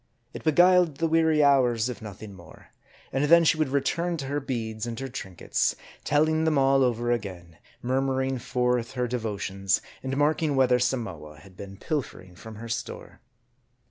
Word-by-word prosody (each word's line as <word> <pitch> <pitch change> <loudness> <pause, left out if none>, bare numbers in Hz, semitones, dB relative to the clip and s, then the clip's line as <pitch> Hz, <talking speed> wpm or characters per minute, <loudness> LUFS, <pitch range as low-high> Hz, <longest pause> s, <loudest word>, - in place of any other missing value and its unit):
It - - -8
be 155 - +3
guiled 175 -1 +4
the 165 - 0
weary 160 -1 +3
hours, 125 -5 +3
if 125 - -6
nothing 105 -1 -9
more; 85 -4 -15 0.4
and 135 +2 +1
then 170 +3 +6
she 160 - +3
would 155 -3 0
return 165 +5 -1
to 140 - -5
her 145 +2 -2
beads 115 -4 -4
and 115 -1 -5
her 135 - -4
trinkets; 95 -8 -2 0.3
telling 155 +2 +2
them 160 -2 +2
all 135 0 +4
over 120 -1 0
again; 90 -7 -5 0.2
murmuring 130 +1 0
forth 125 0 -1
her 125 -1 -1
devotions, 100 -5 -1 0.2
and 135 0 -3
marking 150 0 +1
whether 125 -2 +3
Samoa 95 - -3
had 95 +4 -17
been 100 0 -10
pilfering 95 - -5
from 110 +4 -11
her 115 +2 -8
store. 115 0 -6
125 Hz, 170 wpm, -26 LUFS, 110-145 Hz, 0.4 s, then